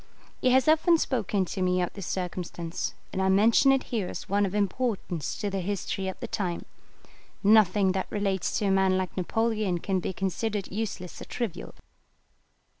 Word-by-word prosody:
He 255 - +4
has 260 +2 +4
often 320 +2 +5
spoken 210 - 0
to 190 +2 -5
me 180 0 +2
of 180 - -1
this 195 -3 -7
circumstance, 175 -2 -4 0.2
and 190 - -1
I 190 - +2
mention 220 +7 +5
it 270 -1 +2
here 210 -6 0
as - - -6
one 200 +1 +2
of 190 - -5
importance 200 - -1
to 205 - -2
the 195 - -1
history 195 0 -3
of 190 - -5
the - - -5
time. 180 -4 -3 0.8
Nothing 200 -2 +5
that 190 0 -2
relates 200 -3 -1
to 210 - -1
a 195 - +2
man 190 -1 +3
like 185 -1 -3
Napoleon 215 0 0
can 190 +2 -1
be 180 - -3
considered 195 +2 -2
useless 195 -3 -4
or - - -6
trivial. 235 -8 -5
195 Hz, 180 wpm, -27 LUFS, 185-215 Hz, 0.8 s, often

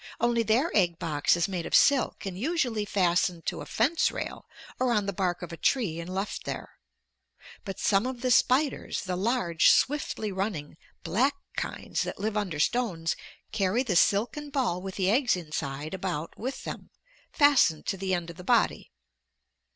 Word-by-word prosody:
Only 235 0 +2
their 230 +9 +1
egg 175 -4 +3
box 150 -2 +1
is 170 - +1
made 180 -4 -3
of - - +1
silk 280 -6 +3
and 190 -2 -4
usually 245 - -1
fastened 175 -3 +1
to - - -3
a - - -8
fence 295 +9 +2
rail - - -6 0.3
or 255 -1 +2
on 210 -3 +1
the 200 - -2
bark 180 -1 -1
of 175 - -7
a - - -7
tree 195 -11 +1
and 170 +2 -6
left 195 +2 -3
there. - - -6 0.9
But 195 -2 -5
some 200 +4 +2
of 255 -2 -5
the 255 -1 +1
spiders, 265 +4 +2
the 185 -1 -2
large, 190 -4 +2
swiftly 260 -7 +1
running, 190 -7 -3 0.3
black 265 +8 +1 0.2
kinds - - -3
that - - -3
live 215 +2 -2
under 190 -8 -2
stones, 170 -4 0 0.4
carry 215 +3 +1
the 210 -8 -1
silken 235 - +2
ball 255 - -1
with 190 0 -6
the 190 0 +1
eggs 245 0 +3
inside 150 -3 -5
about 180 -4 -4
with 260 +4 -5
them, - - -7 0.4
fastened 280 - +4
to 195 - -1
the 190 0 0
end 170 -1 -4
of 170 - -15
the 180 - -9
body. - - +1
195 Hz, 175 wpm, -28 LUFS, 175-245 Hz, 0.9 s, fastened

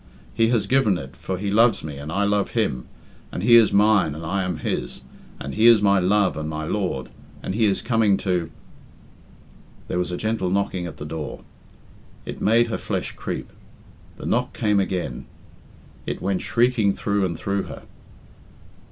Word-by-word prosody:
He 115 - +3
has 115 -4 +1
given 110 -5 +3
it, 65 -4 -9
for 95 +7 -4
he 100 +2 -2
loves 115 +3 +4
me 75 -2 -6
and 75 +2 -6
I 100 +4 0
love 100 +2 0
him, 75 - 0 0.4
and 90 - -4
he 120 +2 +7
is 115 -3 +6
mine 100 -7 +3
and 80 +1 -7
I 95 +4 -1
am 90 -3 -2
his, - - -3 0.4
and 70 - -6
he 110 +2 +4
is 115 -2 +8
my 100 -1 +4
love 100 +2 +2
and 80 0 -4
my 80 0 -4
lord, 90 -7 -2 0.3
and - - -3
he 110 +2 +2
is 100 -2 +1
coming 110 -5 +3
to 90 -4 -1 0.7
" - - -26
There 90 - -1
was 90 0 -1
a 90 - -3
gentle 110 -4 -1
knocking 95 -2 -1
at - - -9
the 75 - -7
door. 75 -1 -6 0.8
It - - -7
made 115 +3 +4
her 110 - -2
flesh - - -3
creep. - - -6 0.7
The - - -8
knock - - 0
came 105 -1 +1
again. 90 -10 -3 0.8
It - - -3
went 95 0 -1
shrieking 115 -4 +2
through 100 -1 0
and 85 -3 -1
through 100 0 -2
her. - - -9
100 Hz, 185 wpm, -23 LUFS, 85-110 Hz, 0.8 s, is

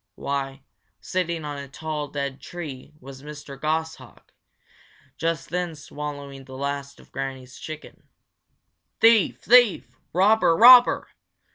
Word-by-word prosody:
Why, 135 -1 -4 0.4
sitting 170 -3 -3
on 145 -1 -5
a 140 - -8
tall, 150 +2 -5
dead 140 -1 -4
tree 155 -7 -8
was 135 0 -12
Mr. 150 -1 -10
Goshawk, 160 +1 -4 0.8
just 165 0 -3
then 175 -2 -3
swallowing 145 -2 -8
the 130 0 -10
last 140 0 -4
of - - -19
Granny's 135 -1 -6
chicken. 155 -1 -9 1.0
"Thief! 225 -3 +4
thief! 245 -4 +4 0.2
robber! 190 -2 +4
robber!" 245 +1 +7
150 Hz, 115 wpm, -24 LUFS, 140-170 Hz, 1.0 s, robber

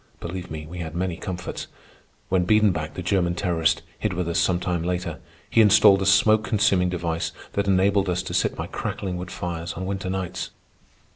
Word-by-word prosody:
Oh, - - -5
believe 90 +1 -6
me, 75 -1 -6
we 90 +3 -8
had 80 -1 -5
many 90 -1 -1
comforts. 90 +1 -5 0.6
When 90 -1 +2
Biedenbach, 90 -7 +2
the 90 - -5
German 90 -2 +1
terrorist, 85 -2 +1 0.2
hid 105 -3 -1
with 90 -1 -2
us 85 - +1
some 90 -2 +2
time 90 -2 -1
later, 90 -1 -3 0.3
he 115 - +4
installed 100 -2 +6
a 95 - 0
smoke 110 +2 +5
consuming 100 -5 +2
device 85 -2 -2 0.2
that 100 0 0
enabled 100 0 +3
us 90 0 0
to - - -6
sit - - +1
by - - -4
crackling 95 -3 -4
wood 90 0 -6
fires 85 -1 -4
on 95 - -5
winter 95 0 -3
nights. 95 -1 -3
90 Hz, 195 wpm, -24 LUFS, 85-95 Hz, 0.6 s, installed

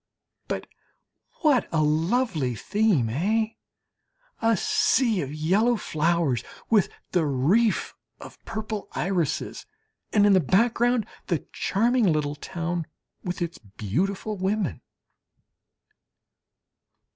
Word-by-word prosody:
But - - -3 0.8
what 295 -7 +3
a 160 -2 +2
lovely 160 - +1
theme 200 - +1
eh? 210 - +1 0.9
A 225 -1 +3
sea 225 +1 +2
of 140 -2 -4
yellow 190 +11 +2
flowers 155 - 0 0.3
with 210 -5 +4 0.2
the 175 -3 +2
reef 155 - +2 0.3
of - - -12
purple 215 -1 -5
irises, 175 -5 -2 0.4
and 205 -1 +4
in 205 - +6
the 190 - +6
background 230 - +2 0.2
the 170 - -1
charming 230 0 +2
little 150 -2 0
town 170 +2 -4 0.4
with 180 -1 -3
its 170 0 -5
beautiful 165 - -3
women! 190 - -1
185 Hz, 100 wpm, -25 LUFS, 155-220 Hz, 0.9 s, in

